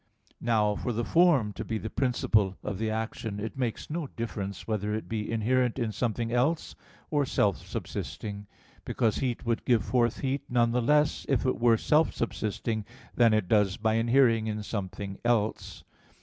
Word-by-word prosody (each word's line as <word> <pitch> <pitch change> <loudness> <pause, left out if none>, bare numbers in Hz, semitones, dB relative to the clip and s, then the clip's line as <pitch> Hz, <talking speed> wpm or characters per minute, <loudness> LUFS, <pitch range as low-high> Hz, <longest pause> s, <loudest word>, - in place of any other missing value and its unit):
Now, 110 -3 +2
for 120 - -2
the 115 +1 -1
form 160 -12 +4
to - - -5
be 110 - -3
the 110 0 -6
principle 110 -7 +1
of 100 -2 -4
the 110 0 0
action, 110 -1 -3
it 110 +2 -5
makes 125 -4 -3
no 160 -1 -3
difference 100 -6 -5
whether 105 -1 -1
it 110 - -5
be 110 -1 -3
inherent 120 +2 +1
in 115 -4 -1
something 115 0 -2
else, 135 +7 +1 0.4
or 145 -2 +2
self 105 -7 +1
subsisting; 100 -1 -5 0.4
because 110 -2 0
heat 125 -3 -2
would 115 0 0
give 120 -6 +2
forth 120 -3 +1
heat 135 0 -1
none 120 -1 +3
the 125 +1 +1
less 150 +4 +2
if 135 -2 +1
it 130 - 0
were 115 -1 +5
self 155 +6 +2
subsisting, 110 -1 -2 0.3
than 115 -2 +5
it 110 -4 +1
does 105 0 +3
by 110 -1 +1
inhering 115 -1 +3
in 105 -1 -3
something 100 -1 -5
else. 115 -3 0
115 Hz, 175 wpm, -28 LUFS, 105-125 Hz, 0.4 s, were